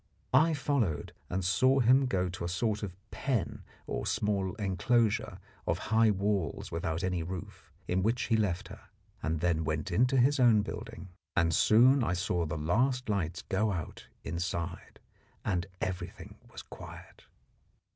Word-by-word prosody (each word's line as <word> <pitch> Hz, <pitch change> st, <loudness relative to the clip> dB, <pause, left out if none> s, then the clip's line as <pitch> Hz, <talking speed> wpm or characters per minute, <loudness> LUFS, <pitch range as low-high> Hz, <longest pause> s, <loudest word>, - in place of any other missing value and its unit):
I 160 Hz, 0 st, +5 dB
followed 125 Hz, -, -1 dB, 0.2 s
and 90 Hz, 0 st, -2 dB
saw 130 Hz, +9 st, +4 dB
him 130 Hz, +2 st, +5 dB
go 95 Hz, -6 st, 0 dB
to 90 Hz, -1 st, -6 dB
a 85 Hz, -, -2 dB
sort 105 Hz, +3 st, -1 dB
of 95 Hz, -4 st, -5 dB, 0.2 s
pen, 125 Hz, -10 st, -2 dB, 0.2 s
or -, -, -3 dB
a -, -, -5 dB
small 100 Hz, -2 st, 0 dB
enclosure 110 Hz, +2 st, +1 dB, 0.3 s
of -, -, +1 dB, 0.2 s
high 110 Hz, 0 st, +5 dB
walls 100 Hz, -4 st, -1 dB
without 80 Hz, +1 st, -2 dB
any 90 Hz, -2 st, 0 dB
roof, 90 Hz, +2 st, -7 dB, 0.2 s
in 90 Hz, +1 st, +1 dB
which 115 Hz, +5 st, +1 dB
he 115 Hz, -, +1 dB
left 100 Hz, -4 st, 0 dB
her, -, -, -12 dB, 0.4 s
and 80 Hz, 0 st, -1 dB
then 85 Hz, -2 st, +1 dB
went 80 Hz, -1 st, -2 dB
in 115 Hz, +9 st, +4 dB
to 135 Hz, +1 st, +1 dB
his 135 Hz, +3 st, +4 dB
own 115 Hz, -5 st, +5 dB
building. 105 Hz, -3 st, -7 dB, 0.3 s
And 85 Hz, -1 st, +3 dB
soon 125 Hz, -, +5 dB
I 90 Hz, -, 0 dB
saw 90 Hz, -2 st, -1 dB
the 80 Hz, +1 st, -3 dB
last 125 Hz, -, +1 dB
lights 90 Hz, -5 st, -1 dB
go 105 Hz, +2 st, 0 dB
out 85 Hz, -5 st, -6 dB, 0.2 s
inside 85 Hz, +1 st, -4 dB, 0.5 s
and 90 Hz, -1 st, 0 dB
everything 95 Hz, -1 st, -5 dB
was -, -, -9 dB
quiet. -, -, -12 dB
95 Hz, 160 wpm, -30 LUFS, 85-115 Hz, 0.5 s, I